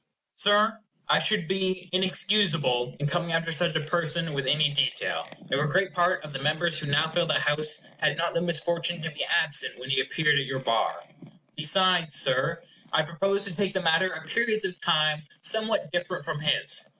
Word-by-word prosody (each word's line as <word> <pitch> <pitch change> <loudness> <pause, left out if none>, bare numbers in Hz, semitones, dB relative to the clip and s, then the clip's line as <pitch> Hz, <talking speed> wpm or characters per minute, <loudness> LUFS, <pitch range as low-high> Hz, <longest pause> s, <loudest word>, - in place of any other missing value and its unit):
Sir, 210 +2 +3 0.3
I - - +4
should 210 -6 +1
be 185 0 -2
inexcusable 185 -10 +2
in 145 - -2
coming 170 +2 -1
after 165 0 -1
such 170 +1 +1
a 160 - +1
person 165 -1 -1
with 140 -2 -3
any 150 +1 +2
detail, 140 -2 -1 0.2
if 135 - +1
a - - 0
great 190 +5 0
part 175 -2 +1
of 150 - -11
the 135 - -5
members 155 +2 +1
who 155 - -5
now 145 +2 +2
fill 170 +2 -1
the 155 - +1
House 150 +1 0 0.2
had 150 -1 +1
not 170 +1 -1
the 170 - 0
misfortune 170 0 -1
to 160 - -4
be 150 - 0
absent 150 -2 +1
when 130 +2 -6
he 135 - +2
appeared 150 -3 +1
at 140 - -2
your 135 0 -3
bar. 115 -4 -1 0.5
Besides, 170 0 +2
Sir, 135 +6 0 0.3
I 160 - +2
propose 195 +5 -1
to 200 - -3
take 195 +2 -1
the 190 - -1
matter 165 +3 +2
at 160 -1 -8
periods 215 +3 0
of 180 -2 -5
time 155 -2 +1
somewhat 220 +8 0
different 175 -3 -4
from 155 -2 -4
his. 150 0 +1
165 Hz, 195 wpm, -26 LUFS, 150-185 Hz, 0.5 s, I